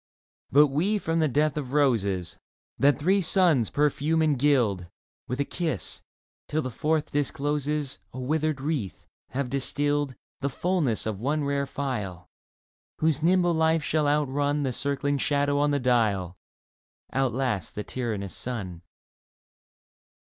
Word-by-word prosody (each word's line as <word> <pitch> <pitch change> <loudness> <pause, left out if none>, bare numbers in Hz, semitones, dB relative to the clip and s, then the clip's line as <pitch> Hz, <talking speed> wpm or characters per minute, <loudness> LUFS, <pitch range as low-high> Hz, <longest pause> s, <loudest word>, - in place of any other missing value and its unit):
But 145 +3 +7
we 180 +10 +1
from 165 -4 -1
the 155 - +3
death 150 +2 +1
of 135 -3 -4
roses 100 - +1 0.4
That 140 +1 +4
three 190 +7 +2
suns 165 - +4
perfume 150 +2 +1
and 155 -2 +3
gild 120 -11 +2 0.4
With 125 +3 -3
a 140 - +1
kiss, 160 - -3 0.5
till 155 +1 -1
the 130 - -4
fourth 155 +4 0
discloses 145 0 -1
A 130 - -7
withered 155 +2 0
wreath, 140 - -3 0.2
have 130 +1 -3
distilled 145 +1 0 0.2
The 140 - -1
fulness 155 - 0
of 110 -3 -3
one 145 +4 0
rare 140 0 0
phial, 105 -12 -4 0.7
Whose 155 -2 +1
nimble 175 +1 +3
life 160 -1 +2
shall 150 0 +1
outrun 145 0 +1
The 130 -2 -1
circling 140 +2 -1
shadow 145 +1 +1
on 145 0 +3
the 145 -1 +1
dial. 110 -8 +1 0.8
Outlast 125 -7 -1
the 105 - -3
tyrannous 105 -7 -4
sun. 95 -9 -4
140 Hz, 135 wpm, -26 LUFS, 125-150 Hz, 0.8 s, But